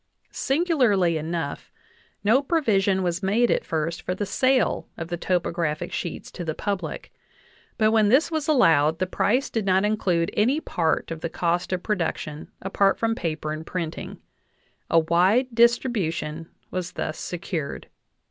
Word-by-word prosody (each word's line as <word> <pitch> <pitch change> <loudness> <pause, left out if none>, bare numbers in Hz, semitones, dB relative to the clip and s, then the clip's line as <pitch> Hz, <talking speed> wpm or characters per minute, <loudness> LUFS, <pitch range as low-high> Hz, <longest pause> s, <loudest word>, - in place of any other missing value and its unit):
Singularly 255 - +2
enough, 160 -1 -4 0.5
no 225 +6 +4
provision 205 - +1
was 175 +1 -1
made 220 +5 +2
at - - +1
first 165 +1 -2
for 180 - -3
the 205 - -2
sale 255 +4 +1
of 165 0 -6
the 175 - -1
topographic 170 -3 -1
sheets 175 - -5
to 175 - -6
the 160 -2 -3
public; 185 -6 -4 0.6
but 215 -1 +3
when 215 -2 +4
this 280 +8 +4
was 315 -2 -2
allowed 160 - +4
the 185 - 0
price 240 +8 +1
did 225 - -1
not 190 +1 +3
include 180 -6 +1
any 250 +8 +2
part 165 - -1
of 165 -1 -5
the 170 - -2
cost 175 +2 -1
of 185 -1 -2
production 165 -6 -3
apart 195 +1 +2
from 225 0 +1
paper 155 -8 -3
and 155 +1 -6
printing; 170 -4 -5 0.7
a 165 - +3
wide 180 +10 +3
distribution 190 - +1 0.2
was 185 0 -4
thus 155 - -4
secured. 165 -4 -4
185 Hz, 150 wpm, -24 LUFS, 165-225 Hz, 0.7 s, no